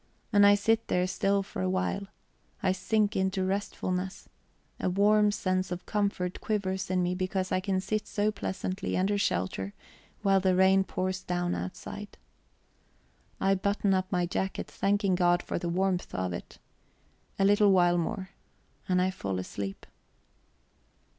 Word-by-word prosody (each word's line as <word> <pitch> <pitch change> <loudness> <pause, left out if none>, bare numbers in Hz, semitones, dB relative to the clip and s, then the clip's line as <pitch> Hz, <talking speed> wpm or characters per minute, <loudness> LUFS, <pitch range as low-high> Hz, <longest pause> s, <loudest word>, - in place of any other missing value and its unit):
And 205 0 +7
I 205 - +7
sit 225 +2 +1
there 180 0 +2
still 195 +1 +1
for 195 - -6
a 185 - 0
while, 185 +2 -1 0.6
I 190 - +3
sink 210 +3 +1
into 190 0 0
restfulness; 190 -1 -3 0.5
a - - 0
warm 210 +3 +4
sense 185 -2 -1
of 180 0 -5
comfort 200 -4 -1
quivers 190 -4 -2
in 185 -1 +1
me 175 0 0
because 185 0 -2
I - - +2
can 190 0 0
sit 210 +3 -2
so 210 +1 0
pleasantly 190 -1 -3
under 200 +2 +1
shelter 95 - -1 0.5
while 195 -1 +4
the 190 -1 +2
rain 190 +1 +5
pours 185 0 -2
down 175 0 -1
outside. 205 +2 -6 1.2
I 195 - +3
button 200 +1 +1
up 185 0 0
my 180 -2 +1
jacket, 190 +2 -2
thanking 200 -1 +1
God 175 -1 +3
for - - -3
the 170 - -3
warmth 185 +1 0
of 90 -1 -2
it. 85 - -8 0.8
A 195 - +3
little 205 0 +5
while 175 -2 +4
more. 190 +2 -3 0.6
And 180 0 +3
I 185 +1 +2
fall 100 - -3
asleep. 95 +1 -5
190 Hz, 155 wpm, -29 LUFS, 180-200 Hz, 1.2 s, And